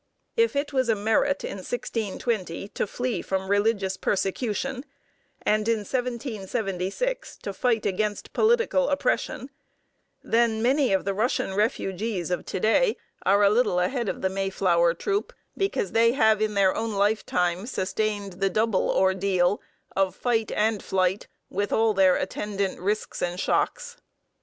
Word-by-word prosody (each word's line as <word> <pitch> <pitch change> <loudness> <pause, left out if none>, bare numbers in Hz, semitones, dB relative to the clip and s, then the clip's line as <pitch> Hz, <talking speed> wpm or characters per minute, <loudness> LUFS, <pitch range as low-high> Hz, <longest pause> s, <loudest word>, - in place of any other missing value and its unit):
If 460 -8 +2
it 285 +1 -1
was 260 -3 +1
a 225 - +4
merit 225 +7 +1
in - - -4
1620 205 -3 -3
to - - -2
flee 245 +3 -2
from 190 0 -2
religious 200 -2 +1
persecution, 245 +6 -1 0.6
and 215 0 +1
in 230 -2 +2
1776 235 - -3
to 200 - -4
fight 225 +1 0
against 210 +2 -2
political 440 - +3
oppression, 285 - -1 0.7
then 230 -1 +2
many 265 +1 +3
of 190 -1 +1
the 195 - 0
Russian 210 -2 0
refugees 200 -3 -1
of 180 - -2
to - - -3
day 425 - +3 0.3
are 200 +2 +5
a 200 - +5
little 215 -5 +2
ahead 235 +4 0
of - - -5
the 190 - +2
Mayflower 185 -3 +1
troop, 405 +1 -2 0.2
because 400 +2 -1
they 230 +1 +4
have 220 -5 +3
in 215 -1 0
their 195 -2 +4
own 225 0 -2
lifetime 200 -2 0
sustained 205 -1 -2
the 195 -1 +2
double 215 0 +1
ordeal 190 0 +2 0.3
of 195 -1 +1
fight 225 -3 0
and 215 -1 +1
flight, 185 +1 0 0.2
with 200 +1 -1
all 220 -1 +3
their 190 -2 +5
attendant 200 0 -2
risks 205 +4 -2
and 175 0 -2
shocks. - - -1
210 Hz, 145 wpm, -26 LUFS, 190-240 Hz, 0.7 s, are